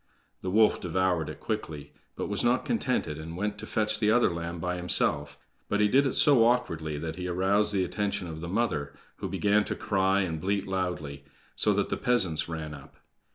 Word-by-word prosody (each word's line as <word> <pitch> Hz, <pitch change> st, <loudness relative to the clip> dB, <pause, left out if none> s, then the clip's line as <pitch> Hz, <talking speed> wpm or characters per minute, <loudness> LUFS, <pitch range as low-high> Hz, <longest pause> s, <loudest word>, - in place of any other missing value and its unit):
The 95 Hz, -, -3 dB
wolf 110 Hz, +3 st, +4 dB
devoured 90 Hz, -3 st, 0 dB
it 75 Hz, -, -8 dB
quickly, 80 Hz, -10 st, -5 dB, 0.2 s
but -, -, -3 dB
was 100 Hz, 0 st, 0 dB
not 120 Hz, +2 st, +2 dB
contented, 125 Hz, -, -1 dB
and 80 Hz, +2 st, -7 dB
went 105 Hz, +1 st, -2 dB
to -, -, -7 dB
fetch 110 Hz, -1 st, 0 dB
the 105 Hz, -1 st, +2 dB
other 120 Hz, -3 st, +4 dB
lamb 85 Hz, +1 st, -4 dB
by 90 Hz, +1 st, -2 dB
himself, 75 Hz, -5 st, 0 dB, 0.3 s
but 105 Hz, -, +1 dB
he 105 Hz, -, +4 dB
did 135 Hz, +6 st, +4 dB
it -, -, -1 dB
so 140 Hz, -6 st, +6 dB
awkwardly 80 Hz, -11 st, 0 dB
that 80 Hz, +2 st, -5 dB
he 90 Hz, 0 st, -4 dB
aroused 95 Hz, +4 st, +2 dB
the 95 Hz, -2 st, +1 dB
attention 100 Hz, +1 st, -2 dB
of 80 Hz, -1 st, -7 dB
the 85 Hz, -, -5 dB
mother, 90 Hz, -9 st, -1 dB, 0.2 s
who -, -, -4 dB
began 105 Hz, +1 st, +2 dB
to -, -, -3 dB
cry 95 Hz, 0 st, +1 dB
and 80 Hz, -4 st, -3 dB
bleat 100 Hz, +2 st, 0 dB
loudly, 90 Hz, -7 st, -3 dB, 0.3 s
so -, -, +2 dB
that -, -, 0 dB
the -, -, -1 dB
peasants 95 Hz, -11 st, +1 dB
ran 80 Hz, -2 st, -5 dB
up. 70 Hz, -3 st, -12 dB
95 Hz, 200 wpm, -28 LUFS, 80-105 Hz, 0.3 s, so